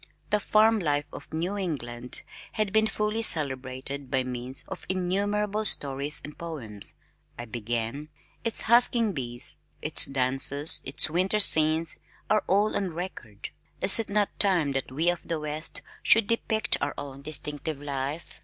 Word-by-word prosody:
"The 210 - +2
Farm 215 +2 +2
Life 145 -4 -2
of - - -11
New 170 +5 -3
England 125 -10 -2 0.3
has 215 -2 -2
been 220 +1 +2
fully 210 +1 -3
celebrated 135 - -1
by 130 -1 0
means 125 +1 -7
of - - -10
innumerable 205 +3 -2
stories 140 -6 +2
and 150 - -10
poems," 125 -12 +4 0.4
I 120 - -7
began, 120 +5 -5 0.3
"its 230 -2 +3
husking 235 -2 +2
bees, 120 -2 +1 0.2
its 150 - +4
dances, 135 +3 +6
its 135 - +2
winter 185 +6 -1
scenes 160 -4 +4 0.3
are 215 - +2
all 205 +3 +1
on 185 -5 -3
record; 140 - -8 0.3
is 200 - +2
it 225 - -4
not 205 0 -2
time 180 -8 +1
that 135 -1 -4
we 155 +6 -2
of 175 - -7
the 165 -2 -3
west 150 +1 -6 0.2
should 225 -1 +3
depict 220 0 -1
our - - -3
own 140 -1 -9
distinctive 150 0 -5
life? 140 +2 -6
155 Hz, 150 wpm, -26 LUFS, 135-200 Hz, 0.4 s, dances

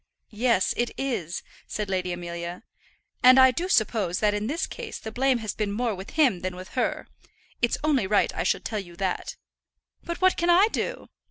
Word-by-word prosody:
"Yes, 225 -3 +2
it 240 0 +1
is," 215 - -3 0.2
said 210 -1 -3
Lady 185 -2 -1
Amelia. 175 +1 -6 0.6
"And 255 +1 +8
I 260 0 +8
do 350 +7 -3
suppose 215 - +2
that 210 -1 +2
in 210 +1 -2
this 320 +7 -1
case 475 -3 -7
the 220 - -7
blame 260 +2 +2
has 220 -3 -4
been 210 -2 -2
more 230 +2 -1
with 190 0 -9
him 260 - +4
than 185 0 -4
with 185 +1 -9
her. 255 - -2 0.5
It's 235 - +2
only 275 -10 +2
right 205 +1 +2
I - - -2
should - - 0
tell 215 -2 -2
you 175 -3 -10
that." 185 0 -3 0.7
"But 340 -1 -5
what 375 0 +3
can 345 0 +1
I 375 +5 +6
do?" - - -4
220 Hz, 195 wpm, -26 LUFS, 185-270 Hz, 0.7 s, And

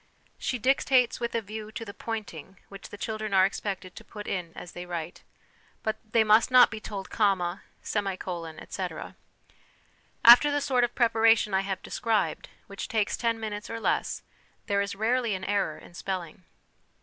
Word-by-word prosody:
She 250 - -1
dictates 255 0 +3
with 235 0 -3
a 230 - 0
view 215 +1 -7
to 230 - -5
the 200 - -8
pointing, 200 -6 -6
which 195 0 -10
the 205 - -9
children 215 -1 -3
are 190 0 +6
expected 195 -2 -4
to - - -10
put 210 -1 -9
in 180 -3 -3
as 175 - -9
they 180 0 -8
write; 170 -1 -5 0.6
but 220 - -1
they 220 +1 +2
must 215 +3 +5
not 255 -1 +7
be 220 - -5
told 200 -3 -7
'comma,' 195 -4 +1 0.2
'semicolon,' 185 -5 -3
etc. - - -6 1.1
After 240 +5 +10
the 290 0 +1
sort 265 -3 +1
of 240 - -1
preparation 225 -3 +4
I 190 - +3
have 195 -1 -4
described, 225 -2 -1 0.2
which 200 - -6
takes 215 -2 0
ten 230 -1 0
minutes 210 -2 -5
or 230 - -4
less, - - -1 0.4
there 200 -2 +1
is 200 0 -3
rarely 230 +1 +1
an 185 - -6
error 205 +1 0
in - - -15
spelling. 180 -2 -5
210 Hz, 175 wpm, -28 LUFS, 190-230 Hz, 1.1 s, After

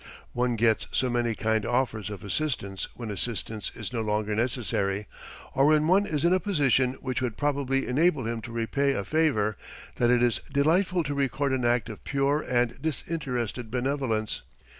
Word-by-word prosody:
One 120 0 +1
gets 115 0 +2
so 130 -2 +1
many 120 -2 0
kind 110 0 +1
offers 120 -4 0
of 105 -2 -7
assistance 100 -4 -2
when 115 -3 -5
assistance 110 0 -3
is - - -6
no 115 - -1
longer 105 0 0
necessary, 105 -4 -1 0.5
or 135 +1 +4
when 155 0 +4
one 195 +4 +4
is 150 0 0
in 175 - +5
a 185 - +3
position 135 - +2
which 130 0 -2
would 120 -4 -2
probably 140 -2 0
enable 145 0 +2
him 115 0 -2
to 115 - -8
repay 135 +5 0
a 100 - -2
favor, 110 - +1 0.4
that 120 - +3
it 120 0 +4
is 120 -1 +2
delightful 170 +5 +2
to 145 -1 -3
record 140 0 0
an 130 -2 0
act 120 -2 +2
of 110 -3 -9
pure 140 +2 +1
and 120 -1 0
disinterested 130 -7 -3
benevolence. 125 -3 -1
125 Hz, 175 wpm, -27 LUFS, 110-140 Hz, 0.5 s, in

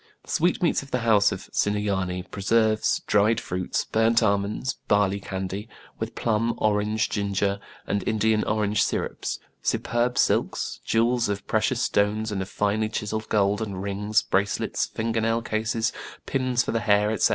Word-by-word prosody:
The - - -9
sweetmeats 170 0 +2
of 140 - -12
the 125 - -1
house 110 -3 +4
of 95 - -6
Sinuyane, 95 -3 0
preserves, 110 +2 +2
dried 105 +2 +3
fruits, 90 0 -2
burnt 115 +1 +3
almonds, 100 +4 0
barley 100 -1 +2
candy; 95 +2 -5 0.3
with - - -4
plum, 115 0 0
orange, 105 +1 +1
ginger, 100 -1 -1 0.3
and 100 - -1
In 110 - -1
dian 110 0 +2
orange 105 -1 +1
sirups; - - -1 0.2
superb 120 +1 0
silks; - - +1
jewels 115 0 +2
of 100 0 -3
pre 110 - +1
cious 125 +1 0
stones 105 +2 +1
and 100 -2 -2
of 95 - -5
finely 105 +1 0
chiselled 110 0 -3
gold; 100 0 +2
and 100 -4 -4
rings, 105 +2 0
bracelets, 100 +1 0
finger 115 0 -2
nail 115 +1 +1
cases, 110 +1 -1 0.3
pins 130 -2 +1
for - - -3
the 115 - 0
hair, 105 -2 +3
etc. 110 - +3
105 Hz, 160 wpm, -25 LUFS, 100-115 Hz, 0.3 s, house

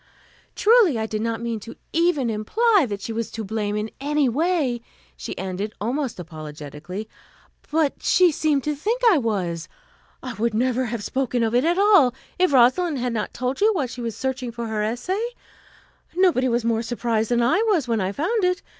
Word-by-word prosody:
"Truly, 425 - +5
I 220 - -1
did 215 -1 -3
not 230 0 -2
mean 230 -2 -2
to 230 +3 -10 0.2
even 325 -8 +2
imply 390 - +2
that 200 -1 -4
she 225 - -4
was 230 0 -3
to 220 0 -5
blame 210 0 -2
in 210 +1 -3
any 290 0 +1
way," 280 -2 0 0.3
she - - -7
ended, 190 +3 -4
almost 245 +1 -2
apologetically, 155 +3 -8 0.6
"but 305 -2 0
she 360 -2 +4
seemed 295 -2 +1
to 300 - -1
think 445 - -2
I 340 - +4
was. 185 -8 -2 0.6
I 255 -2 -5
would 230 0 -1
never 255 +2 +1
have 235 -2 -4
spoken 250 -1 -1
of 225 0 0
it 245 +4 +3
at 345 +2 +2
all, 390 - +5 0.2
if 370 -3 +3
Rosalind 275 +5 +4
had 245 -1 -2
not 215 -2 -2
told 255 +5 -3
you 430 +2 +5
while 295 -7 0
she 245 0 -7
was 230 -2 -4
searching 260 -2 -3
for 235 0 -5
her 220 -1 -2
essay. 245 - -2 0.9
Nobody 350 -9 +3
was 235 -1 0
more 230 -1 +1
surprised 230 -2 -1
than 240 -1 +2
I 260 - +3
was 345 - +2
when 225 -3 0
I 185 +1 -1
found 375 - -1
it. 365 +1 +1
240 Hz, 190 wpm, -23 LUFS, 220-300 Hz, 0.9 s, Truly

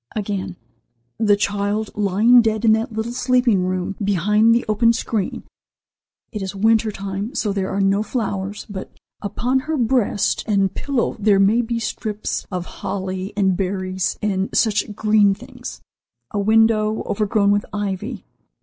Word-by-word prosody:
Again: 200 -3 -3 0.6
"The 210 -2 +4
child 205 +1 -1
lying 210 +5 +4
dead 220 0 0
in 220 - +6
the 220 +2 +1
little 220 +1 -3
sleeping 245 -6 +2
room, 185 +1 -2
behind 210 +4 +3
the 240 - 0
open 230 +2 +3
screen. 220 -3 -2 0.9
It 210 - -5
is 190 +1 -5
winter 220 +2 +2
time, 200 +4 -5
so 210 -3 0
there 195 -1 -2
are 195 +1 -1
no 195 +1 +2
flowers, 205 -3 -3
but 200 -2 -7 0.3
upon 245 +6 0
her 305 +3 -3
breast 235 -4 +1
and 195 -3 +1
pillow 275 -5 -1
there 205 -2 +3
may 210 +5 +4
be 235 0 -2
strips 215 -1 -3
of 180 -2 -3 0.2
holly 190 -1 -3
and 190 -2 +2
berries 185 -1 -2
and 195 -2 0
such 215 -1 +1
green 210 -2 +3
things. - - -10 0.5
A 210 - -2
window, 220 +1 +3
overgrown 205 0 +1
with 205 0 +1
ivy. 205 +2 -4
210 Hz, 150 wpm, -21 LUFS, 195-225 Hz, 0.9 s, in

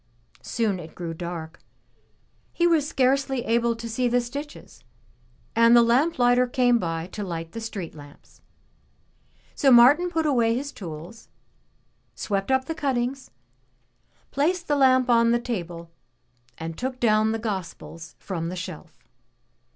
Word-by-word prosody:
Soon 215 -5 -1
it 160 -2 -11
grew 170 -2 -5
dark; 165 -1 -7 0.9
he 345 - 0
was 320 -4 +2
scarcely 265 -1 +1
able 235 +1 +1
to 230 0 -7
see 245 +2 -1
the 245 +1 +2
stitches, 280 +5 -8 0.7
and 230 +1 +6
the 235 - +7
lamp 260 +8 +2
lighter 245 0 +3
came 245 -1 +2
by 165 -3 -3
to 210 - -5
light 165 -3 -5
the 230 - -7
street 205 -6 -6
lamps. 145 -2 -16 1.1
So 275 -3 +3
Martin 270 +9 +6
put 325 -2 -1
away 235 -6 +2
his 280 +3 -4
tools, 175 +4 -10 0.9
swept 195 0 -2
up 265 0 +2
the 325 - -3
cuttings, 270 -3 -2 1.0
placed 345 +5 0
the 290 - +2
lamp 260 -2 +4
on 230 -1 +4
the 240 - +2
table, 175 -8 -6 0.7
and 165 0 -6
took 255 +3 -4
down 215 -1 +3
the 225 - -1
Gospels 180 -6 -6
from 170 -4 -4
the 180 - -5
shelf. 180 -3 -9
235 Hz, 145 wpm, -24 LUFS, 180-260 Hz, 1.1 s, the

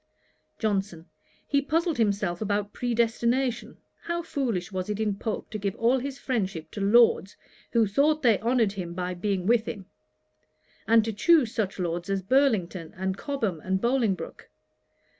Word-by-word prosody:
JOHNSON. 195 -6 -2 0.4
'He 280 -1 +2
puzzled 325 0 0
himself 200 -4 0
about 205 -1 -1
predestination. 235 +1 0 0.3
How 340 0 -2
foolish 235 - -2
was 185 +1 -4
it 210 0 -2
in 210 -2 0
Pope 215 +1 -4
to 215 - -4
give 200 -1 -2
all 240 +3 +2
his 275 +1 -5
friendship 190 - -3
to 205 - -6
Lords, 205 -1 +4 0.4
who 230 -2 +4
thought 290 +9 +2
they 230 -5 +4
honoured 230 -2 +2
him 180 -4 -6
by 180 0 -2
being 185 0 -2
with 230 +1 +3
him; 195 -2 -6 1.0
and 225 -1 +5
to 225 - -2
choose 260 - +4
such 210 -5 -2
Lords 175 0 -3
as 195 -1 -1
Burlington, 195 - +1
and 190 0 -1
Cobham, 225 - -2
and 190 0 0
Bolingbroke! 235 -4 -1
215 Hz, 155 wpm, -27 LUFS, 190-245 Hz, 1.0 s, and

